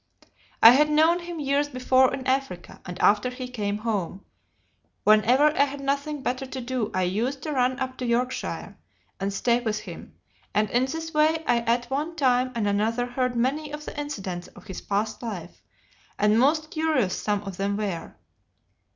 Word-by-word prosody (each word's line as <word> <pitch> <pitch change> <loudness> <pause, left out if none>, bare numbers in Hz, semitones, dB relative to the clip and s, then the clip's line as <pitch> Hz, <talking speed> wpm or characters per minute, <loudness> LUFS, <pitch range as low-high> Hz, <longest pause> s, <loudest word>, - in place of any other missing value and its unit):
I 225 - +12
had 300 +4 +4
known 320 +3 +4
him 345 -1 -7
years 285 0 +1
before 255 0 +3
in 270 -1 -5
Africa, 260 -10 -2
and 180 0 -7
after 210 +4 +3
he 250 0 -6
came 210 -5 -3
home, 200 -4 -3 0.8
whenever 250 +8 +5
I 280 - +4
had 285 0 -7
nothing 280 +1 -2
better 255 +2 -2
to 260 - -6
do, 245 -3 -2
I 185 - 0
used 230 +10 -1
to 310 - -3
run 255 -2 +1
up 260 -1 -3
to 250 - -2
Yorkshire 250 +2 -2 0.4
and 195 +1 -1
stay 235 +4 +1
with 220 -3 -2
him, - - -10 0.4
and 210 0 +1
in 245 +2 +2
this 325 +4 -5
way 315 +1 +2
I 240 -1 +3
at 240 +1 -1
one 305 +5 -2
time 255 -4 +2
and 220 -3 0
another 220 +4 +1
heard 250 0 -1
many 280 +5 -1
of 300 0 -7
the - - -7
incidents 195 - -5
of - - -16
his 190 - -7
past 210 +2 -2
life, 190 -8 -7 0.6
and 210 +2 +3
most 310 +4 +2
curious 310 - +1
some 205 -1 -1
of 195 -3 -7
them 200 +1 -1
were. 195 -6 -4
250 Hz, 180 wpm, -25 LUFS, 210-280 Hz, 0.8 s, I